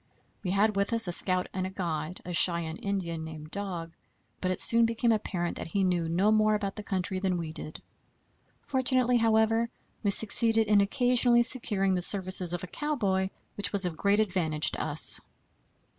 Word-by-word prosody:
We 185 - -4
had 205 +3 0
with 200 +3 -2
us 230 0 +3
as - - -3
a - - -2
scout 185 +1 +5
and 185 0 -5
guide 170 -1 -5
a 180 - -7
Cheyenne 170 -2 +1
Indian, 175 -5 -5
named 155 -1 -11
Dog, 180 -5 -6 0.5
but 185 - -2
it 185 - -3
soon 230 0 +6
became 230 +1 -1
apparent 180 -5 -3
that - - -7
he 195 +3 -2
knew 175 -3 -1
no 190 +6 +1
more 215 0 +2
about 200 -2 -5
the 210 - -7
country 190 -1 -3
than 185 -2 -2
we 165 -2 -6
did. 155 - -7 0.8
Fortunately, 255 -2 0
however, 225 0 +1 0.3
we 205 - -1
succeeded 225 +2 +3
in 210 -1 +2
occasionally 245 +2 +2
securing 210 -6 0
the 180 - -2
services 185 -1 +4
of 175 -1 -5
a 180 - -11
cowboy, 200 -11 -2 0.3
which 205 - -3
was 200 -2 -2
of 175 -3 -4
great 200 +4 0
advantage 175 -7 +1
to - - -6
us. - - +5
195 Hz, 185 wpm, -27 LUFS, 180-220 Hz, 0.8 s, soon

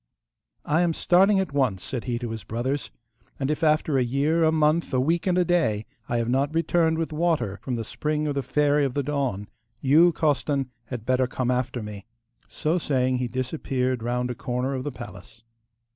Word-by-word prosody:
'I 155 +3 +2
am 170 -2 +2
starting 195 +3 +4
at 190 -7 -2
once,' 125 -10 +1
said 125 -4 -5
he 120 -2 -1
to 120 -1 -4
his 110 -1 -6
brothers, 130 +5 -2 0.5
'and 135 +1 0
if 155 - -2
after 155 -2 +3
a - - +3
year, 145 +7 +1
a 160 - +4
month, 155 +1 +2
a - - +3
week, 165 +7 +1
and 180 -1 +2
a 180 - +3
day 110 -12 +1 0.2
I 120 - +1
have 115 -1 0
not 135 +5 0
returned 165 0 +2
with 165 0 -1
the 155 - -7
water 155 - 0
from 125 - -3
the 115 - -3
spring 150 +6 -2
of 145 - 0
the 140 - -1
Fairy 145 +2 +2
of 135 -3 -1
the 145 - 0
Dawn, 135 -8 -2 0.3
you, 160 +6 +5
Costan, 145 -4 0
had 115 -2 -6
better 130 0 +2
come 125 0 -1
after 125 -2 -1
me.' 105 -1 -8 0.4
So 160 +3 -1
saying 130 -4 +1
he 125 - -1
disappeared 130 -1 -2
round 125 +1 -1
a - - -2
corner 125 +2 -2
of 130 -1 -3
the 145 - -3
palace. 110 -1 -11
135 Hz, 205 wpm, -25 LUFS, 125-155 Hz, 0.5 s, you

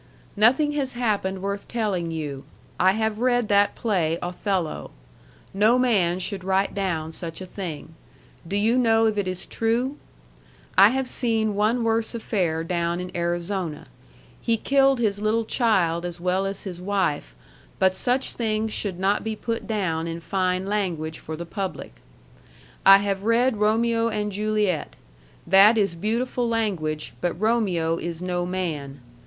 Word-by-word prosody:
Nothing 260 +8 +4
has 280 -3 -2
happened 200 -6 -1
worth 200 0 -3
telling 205 -8 -1
you. 145 -4 -5 0.4
I 185 +1 +5
have 220 0 -1
read 245 -2 +1
that 205 0 +3
play 175 -8 0
Othello. 180 -1 -2 0.6
No 215 +5 +4
man 200 -9 +2
should 190 +1 -4
write 190 +1 +1
down 170 -6 -2
such 165 0 -7
a 185 - -6
thing. 165 -4 -7 0.5
Do 195 - -3
you 225 +5 +2
know 225 -2 +4
if 215 -2 +1
it 195 - -1
is 185 0 -4
true? 240 +5 -1 0.8
I 200 - +8
have 265 +2 -1
seen 225 -4 0
one 215 +4 +1
worse 225 +1 0
affair 180 -8 -1
down 170 0 -1
in 180 0 -7
Arizona. 175 -1 -2 0.6
He 230 -1 +1
killed 275 +2 +3
his 210 -4 0
little 220 +2 +1
child 185 -9 +1
as 175 -1 -5
well 185 +2 0
as 195 0 -5
his 180 -3 -7
wife 180 - -1 0.4
but 190 0 +3
such 250 +6 -1
things 220 -1 -1
should 195 -4 -3
not 195 +2 +1
be 220 -1 -3
put 230 +1 -4
down 170 -7 -1
in 165 0 -4
fine 185 +1 -1
language 175 -6 -2
for 160 0 -7
the 170 - -6
public. 190 +2 -5 0.9
I 195 0 +11
have 200 -1 -2
read 230 +2 +2
Romeo 230 +2 +2
and 210 -1 -2
Juliet. 210 -4 -1 0.5
That 195 +5 +7
is 200 -4 +2
beautiful 235 +6 -1
language 175 -10 -2
but 175 -1 -2
Romeo 190 -7 +1
is 170 -1 -5
no 180 -1 -2
man. 150 -7 -4
200 Hz, 155 wpm, -24 LUFS, 175-225 Hz, 0.9 s, I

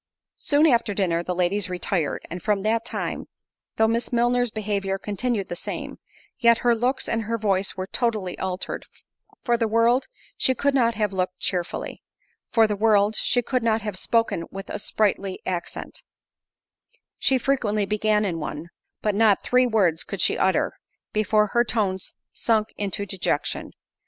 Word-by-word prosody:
Soon 290 +2 +3
after 235 -8 +3
dinner 175 -4 +1
the 180 +1 -3
ladies 185 +2 +1
retired; 180 -3 -2
and 175 +2 -6
from 205 -3 0
that 225 +1 +1
time, 235 - -4 0.5
though 220 - +3
Miss 230 +2 -1
Milner's 245 0 +2
behaviour 200 -3 -2
continued 210 +1 -2
the 175 - -5
same, - - -6 0.4
yet 235 -2 +5
her 240 - +6
looks 245 +3 0
and 230 -1 -1
her 230 +2 -1
voice 195 -3 0
were 185 - -2
totally 210 -4 -1
altered—for 190 +5 -5
the 230 -1 +1
world, 230 +4 +3 0.3
she 260 - +2
could 280 +3 +1
not 235 -4 +3
have 210 -2 0
looked 185 -1 -1
cheerfully; 180 -2 -3 0.5
for 225 -2 +5
the 210 -1 -1
world, 210 0 +3
she 245 +2 +2
could 255 +1 0
not 225 -2 +1
have 210 -3 -3
spoken 230 -7 +1
with 195 +1 -8
a - - -3
sprightly 200 -2 0
accent; 185 - -5 1.2
she 265 - +3
frequently 225 -6 0
began 210 +1 +1
in 170 -4 -2
one, 150 +2 -5 0.3
but 210 - +1
not 210 -1 +3
three 250 0 +3
words 190 -8 +2
could - - -6
she - - +3
utter, - - +1 0.4
before 210 0 +2
her 240 - +4
tones 195 -6 -1 0.2
sunk 220 -2 +1
into 200 0 -1
dejection. 190 -2 -2
215 Hz, 160 wpm, -24 LUFS, 195-230 Hz, 1.2 s, her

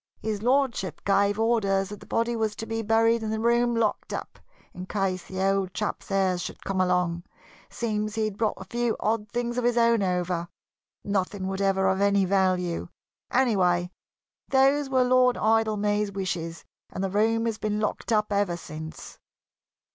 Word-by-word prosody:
His 215 -2 -3
Lordship 245 - +1
gave 200 +1 +2
orders 200 -4 +1
that 205 -1 -8
the - - -14
body 235 +1 0
was 220 -2 -1
to 225 - -6
be 225 0 -3
buried 225 +1 +3
and 215 -1 -3
the 220 - -1
room 235 +1 +2
locked 225 -2 0
up, - - -6 0.3
in 185 +1 -8
case 190 -3 -2
the 190 - -6
old 195 -2 0
chap's 210 - -3
heirs 190 -2 +1
should - - -7
come 190 -1 0
along. 180 -2 +1 0.5
Seems 215 -2 -2
he'd 215 -2 -1
brought 215 0 0
a 190 - -8
few 240 +2 -1
odd 215 -1 -1
things 240 +1 -2
of - - -2
his 240 0 +2
own 230 -2 +4
over 180 -2 -1 0.6
nothing 195 -1 -1
whatever 190 0 +1
of 190 +1 +1
any 200 -1 +3
value. 185 -2 +1 0.4
Anyway, 180 -8 +2 0.6
those 275 +1 +3
were 260 -1 +3
Lord 250 0 +4
Idlemay's 210 -2 +1
wishes, 175 -4 -4 0.3
and 190 - -4
the 190 - -1
room 225 +3 +2
has 225 -2 -2
been 210 0 -1
locked 215 +2 -2
up 210 -1 +2
ever 200 -4 +1
since." 155 -1 -9
210 Hz, 170 wpm, -26 LUFS, 190-225 Hz, 0.6 s, own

